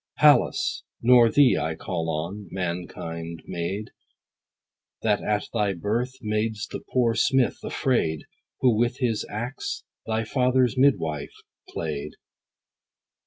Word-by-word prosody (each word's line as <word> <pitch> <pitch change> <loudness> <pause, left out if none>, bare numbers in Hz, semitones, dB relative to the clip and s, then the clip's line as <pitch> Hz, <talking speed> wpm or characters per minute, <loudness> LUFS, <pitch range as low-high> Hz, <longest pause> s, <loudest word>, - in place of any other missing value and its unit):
Pallas, 370 +1 +4 0.2
nor 120 -1 +7
thee 140 0 +5
I 80 0 -2
call 80 0 -3
on, 85 +6 -4
mankind 85 -2 -5
maid, 95 +5 -4 1.1
That 105 -2 +2
at 105 -2 -1
thy 105 -4 +1
birth, 115 +8 -1
mad'st 105 0 -2
the - - -4
poor 120 -3 +3
smith 130 +2 +2
afraid, 80 - 0 0.4
Who 125 -3 +4
with 120 +3 +1
his 115 -5 -1
axe, 120 +5 -4 0.2
thy 110 0 0
father's 125 0 +2
midwife 80 - +1 0.3
plaid. 75 -1 -4
105 Hz, 115 wpm, -25 LUFS, 85-125 Hz, 1.1 s, nor